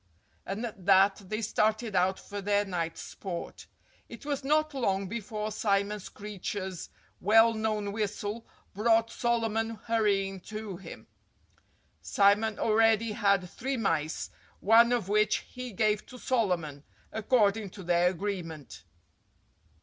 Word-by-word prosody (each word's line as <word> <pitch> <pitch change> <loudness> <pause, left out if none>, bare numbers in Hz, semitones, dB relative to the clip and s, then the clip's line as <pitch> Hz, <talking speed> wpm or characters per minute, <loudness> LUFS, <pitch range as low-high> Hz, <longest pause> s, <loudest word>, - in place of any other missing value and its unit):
And 200 +5 -3
at 200 -5 -9
that 195 +1 +5
they 215 +1 -2
started 215 0 0
out 185 +1 +2
for 205 0 -7
their 205 +1 +1
night's 170 -4 -3
sport. 180 -4 -7 0.4
It 235 +3 -11
was 285 -2 -2
not 305 +2 +2
long 200 -7 0
before 215 0 -4
Simon 205 0 0
Screecher's 195 -2 -6 0.3
well 225 +3 +5
known 215 -2 -1
whistle 210 +1 -3 0.3
brought 225 +2 +2
Solomon 225 -2 0
hurrying 200 -4 +1
to 215 -1 -7
him. 190 - -11 1.0
Simon 205 +2 +3
already 225 0 +3
had 200 -3 +2
three 265 +8 -3
mice, 160 -8 -1 0.3
one 230 +3 +6
of 240 -6 0
which 210 +1 +2
he 250 -1 -6
gave 210 +1 0
to 250 - -11
Solomon, 180 - -1 0.3
according 215 -2 +2
to 190 +1 -11
their 175 0 +3
agreement. 170 - -5
210 Hz, 125 wpm, -29 LUFS, 195-225 Hz, 1.0 s, one